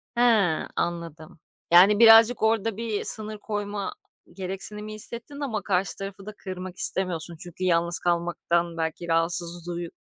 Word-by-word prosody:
He, 240 - 0 0.5
anladım. 165 -2 -5 0.3
Yani, 195 +5 +6
birazcık 225 +1 +7
orada 220 -1 +1
bir 225 -2 -3
sınır 215 0 -1
koyma 205 - -4 0.4
gereksinimi 205 +3 -5
hissettin 235 +6 -4
ama 235 -8 -3
karşı 190 -1 -1
tarafı 195 0 -7
da 215 - -8
kırmak 185 -1 -8
istemiyorsun. 170 -3 +2
Çünkü 175 +2 -8
yalnız 170 -1 +2
kalmaktan 170 0 -1
belki 165 +1 -4
rahatsız 170 +1 -1
duyu 175 -1 -5
185 Hz, 130 wpm, -25 LUFS, 170-215 Hz, 0.5 s, birazcık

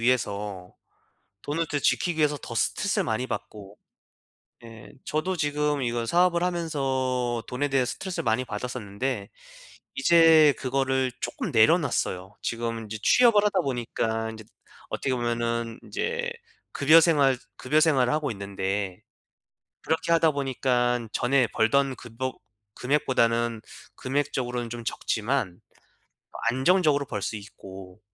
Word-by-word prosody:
위해서 105 -6 -1 0.7
돈을 160 +3 -2
더 145 - 0
지키기 175 +3 +1
위해서 150 -1 +2
더 - - -7
스트레스를 - - 0
많이 110 +3 -1
받고. 105 -4 -7 0.9
예. 115 -2 -12
저도 170 +5 -1
지금 150 -1 0
이거 120 -2 -1
사업을 175 +4 +2
하면서 130 -8 -1
돈에 130 +3 -1
대해 135 -2 +2
스트레스를 185 +8 -4
많이 115 +3 +1
받았었는데 110 -1 -4 0.7
이제 165 -3 +6
그거를 130 -1 0
쪼끔 - - -4
내려놨어요. 110 - +2
지금 115 -1 -3
인제 110 -1 -7
취업을 225 - +5
하다 200 -2 +2
보니까 115 -5 -2
인제 110 0 -9 0.5
어떻게 130 - -1
보면은 115 -1 -2
인제 480 0 -3 0.4
급여 155 +4 +6
생활 140 -6 +3 0.2
급여 150 +4 +1
생활을 140 -5 +3
하고 150 -2 0
있는데 100 -1 -3 0.8
그렇게 160 +1 -1
하다 165 -1 +5
보니깐 125 -4 0
전에 125 -1 +2
벌던 135 +4 +2
급여 125 +2 -5 0.4
금액보다는 120 -5 +1 0.8
금액적으로는 120 -1 -4
좀 120 0 -6
적지만 110 -4 -2 0.9
안정적으로 145 +3 +3
벌 105 -5 -5
수 110 - -3
있고 95 -2 -11
125 Hz, 290 characters per minute, -26 LUFS, 115-150 Hz, 0.9 s, 이제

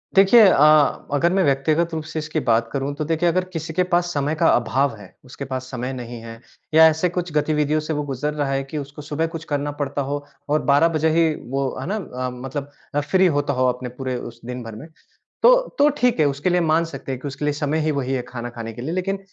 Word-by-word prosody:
देखिए 195 +5 +7
अ, 150 -3 +4
अगर 155 +4 +2
मैं 190 0 +3
व्यक्तिगत 155 +4 +1
रूप 160 -1 -3
से 155 +1 -5
इसकी 155 +1 -2
बात 115 0 +2
करूँ 140 +2 -2
तो 155 +1 -3
देखिए 165 +2 +1
अगर 185 +2 +1
किसी 160 -1 -5
के 180 +3 +2
पास 175 0 +3
समय 145 +2 0
का - - +2
अभाव 125 +2 +1
है, 105 -3 -14
उसके 130 +2 -8
पास 130 -1 -4
समय 125 +1 -4
नहीं 120 -2 -7
है 115 0 -10 0.3
या 160 +1 +8
ऐसे 160 +3 +1
कुछ 175 0 -3
गतिविधियों 150 0 +1
से 155 +1 -3
वो 150 -1 -2
गुजर 145 +1 -3
रहा 145 -2 -1
है 135 0 0
कि 135 +3 -7
उसको 145 +1 -7
सुबह 150 +2 -2
कुछ 165 - -5
करना 145 0 -1
पड़ता 140 0 -2
हो 145 0 -3 0.2
और 150 +1 +2
12 145 +4 +5
बजे 155 +1 +2
ही 160 0 +3 0.2
वो 135 0 0 0.2
है - - -5
ना? 205 - -1 0.3
अ, - - -1
मतलब 135 +3 -6 0.4
फ्री 190 0 +5
होता 145 0 0
हो 130 0 +2
अपने 125 0 -4
पूरे 130 +1 -4
उस 120 -1 -9
दिन 125 0 -5
भर 115 -1 -8
में, 140 +9 -10 0.6
तो - - +8 0.2
तो 290 - +6
ठीक 245 -5 +2
है 150 - +5
उसके 145 +5 0
लिए 180 0 +2
मान 165 0 +2
सकते 135 -4 -7
हैं 125 - -5
कि 145 - -5
उसके 140 +2 -6
लिए 150 - +1
समय 150 +1 -1
ही 155 - +1
वही 135 -2 -2
है 130 - -1
खाना 120 -1 -7
खाने 115 -1 -7
के 120 - -8
लिए 155 - -3
लेकिन 195 +2 -1
145 Hz, 250 wpm, -22 LUFS, 130-160 Hz, 0.6 s, या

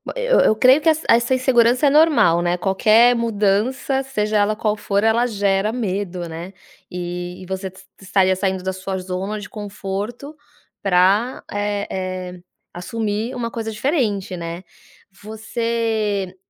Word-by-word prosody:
Eu - - +2
eu 215 - +3
creio 255 +6 +5
que 325 - +3
essa 315 0 +1
essa 235 +2 +4
insegurança 255 +1 +3
é - - +6
normal, 290 - +4
né, 175 +1 0
qualquer 215 +6 +4
mudança, 230 +5 0
seja 215 -5 -1
ela 205 +1 +2
qual 215 -1 0
for, 200 0 -1
ela 225 +2 +3
gera 205 -2 0
medo, 190 -6 -3
né. 170 +4 -8 0.4
E 175 0 -5
e 185 - -9
você 190 0 -4 0.3
estaria 190 -1 +2
saindo 190 -1 -2
da 190 - -1
sua 190 +1 -4
zona 190 +3 -4
de 205 - -9
conforto 210 +7 -6 0.5
para, 195 +6 +2
eh 205 0 -2 0.5
eh, - - -14 0.3
assumir 220 +4 -3
uma 230 -1 -3
coisa 225 -1 -5
diferente, 215 - -1
né. 170 +2 -6 0.6
Você 220 -3 -2
210 Hz, 140 wpm, -20 LUFS, 190-235 Hz, 0.6 s, é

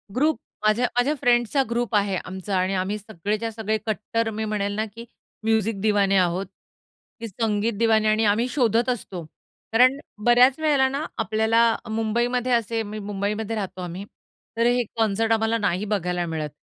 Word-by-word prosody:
Group 300 +4 +2 0.3
माझ्या 215 +4 +3
माझ्या 265 +5 +3
फ्रेंड्सचा 245 +2 +3
group 235 -2 -1
आहे 200 -1 +2
आमचा 190 +1 -4
आणि 185 +1 0
आम्ही 190 +3 -1
सगळेच्या 215 +2 -3
सगळे 220 0 -2
कट्टर 225 +1 -1
मी 220 0 -3
म्हणेल 205 -1 -2
ना, 215 +1 -1
की 225 +2 -11 0.4
म्युझिक 220 -1 +1
दिवाने. 205 -2 +2
आहोत. 180 +1 +1 0.7
की 230 - -5
संगीत 215 +2 -1
दिवानी. 220 -1 +3
आणि 215 +1 +2
आम्ही 215 +4 +2
शोधत 240 -2 +1
असतो. 195 -7 -4 0.5
कारण 255 +4 +5 0.3
बऱ्याच 250 +3 +5
वेळेला 290 -4 +3
ना, 280 +4 -3
आपल्याला 225 0 +2 0.3
मुंबईमध्ये 235 +3 0
असे 230 -1 +1
मी 215 +1 -6
मुंबईमध्ये 205 +2 -3
राहतो 190 -3 -5
आम्ही. 180 +3 -6 0.5
तर 230 - +2
हे 245 0 +3
कॉन्सर्ट 225 0 +1
आम्हाला 225 0 +2
नाही 205 -2 -1
बघायला 180 -4 -1
मिळत, 155 -2 -3
220 Hz, 160 wpm, -24 LUFS, 205-235 Hz, 0.7 s, कारण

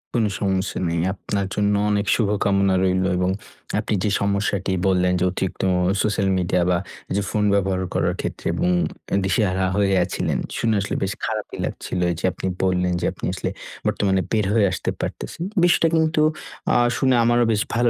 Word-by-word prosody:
কোন 115 -2 +3 0.2
সমস্যা 95 -1 -1
নেই। 85 0 0
আপনার 100 +2 -3
জন্য 105 0 +2 0.2
অনেক 100 0 +1
শুভকামনা 100 -3 +2
রইলো 95 0 +2
এবং 90 +1 +1 0.5
আপনি - - -2
যে 105 - +2
সমস্যাটি 100 -1 0 0.2
বললেন 90 -1 +2
যে, - - +1
অতিরিক্ত 95 0 -3
অ - - +2 0.3
সোশ্যাল 105 -2 +1
মিডিয়া 90 0 +1
বা, 90 - +3 0.4
যে 100 - +1
ফোন 105 - 0
ব্যবহার 95 -2 +1
করার - - +1
ক্ষেত্রে - - -5
এবং 90 - +1 0.4
অ্যা - - +1
দিশেহারা 95 0 +1
হয়ে 100 -1 +2
আছিলেন। - - -2 0.2
শুনে 115 -1 +1
আসলে 100 - -3
বেশ 95 0 -1
খারাপই 110 -1 -4
লাগছিল। 90 - -4
এইযে 85 +1 -3
আপনি - - -4 0.2
বললেন 90 -1 +1
যে, - - 0
আপনি - - -6
আসলে - - -3 0.4
বর্তমানে 95 -2 +1
বের 110 -2 +2
হয়ে 110 -2 +4
আসতে 95 - -2
পারতেছেন। - - -5 0.2
বিষয়টা 175 -1 +4
কিন্তু 160 -1 +2 0.5
আ - - +6 0.2
শুনে 130 -1 +3
আমারও 120 +1 +3
বেশ 105 -1 +1
ভালো 120 +1 +3
100 Hz, 175 wpm, -22 LUFS, 95-105 Hz, 0.5 s, আ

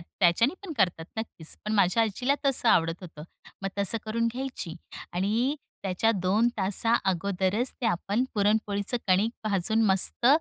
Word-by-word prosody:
त्याच्याने 180 - +1
पण 345 - -5
करतात 175 -4 +1
नक्कीच; 215 -8 -6
पण 215 - -2
माझ्या 200 +2 +3
आजीला 245 +6 0
तसं 260 -3 +2
आवडत 165 -4 +2
होतं. 160 -4 -10 0.4
मग 195 - -1
तसं 200 +3 +2
करून 230 +1 -1
घ्यायची 255 -10 -5 0.4
आणि 215 +10 0 0.3
त्याच्या 195 +3 +1
2 210 +6 +3
तासा 205 +4 +2 0.2
अगोदरच 195 +6 -1
ते 245 - 0
आपण 205 +4 0
पुरणपोळीचं 205 +1 0
कणिक 195 +4 +3
भाजून 215 +2 +1
मस्त 195 +5 +4
205 Hz, 145 wpm, -27 LUFS, 185-230 Hz, 0.4 s, मस्त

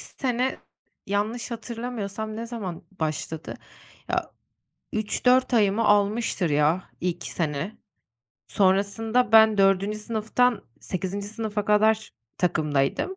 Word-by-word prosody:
sene, 255 0 -2 0.5
yanlış 215 +5 -2
hatırlamıyorsam 220 -2 -5
ne 230 +1 -5
zaman 205 -8 -6 0.2
başladı? 155 0 -3 0.5
Ya, - - -1 0.6
3-4 250 +4 +2
ayımı 210 0 +3
almıştır 205 -3 +2
ya, 150 +5 +1
ilk 180 -1 -2
sene. 160 +4 -3 0.7
Sonrasında 205 +5 +1
ben 220 -1 +7
4. 195 +2 +3
sınıftan 225 +2 0 0.2
8. 190 +2 -4
sınıfa 215 -1 -3
kadar 215 +1 +3 0.3
takımdaydım. 155 - 0
210 Hz, 95 wpm, -25 LUFS, 190-230 Hz, 0.7 s, ben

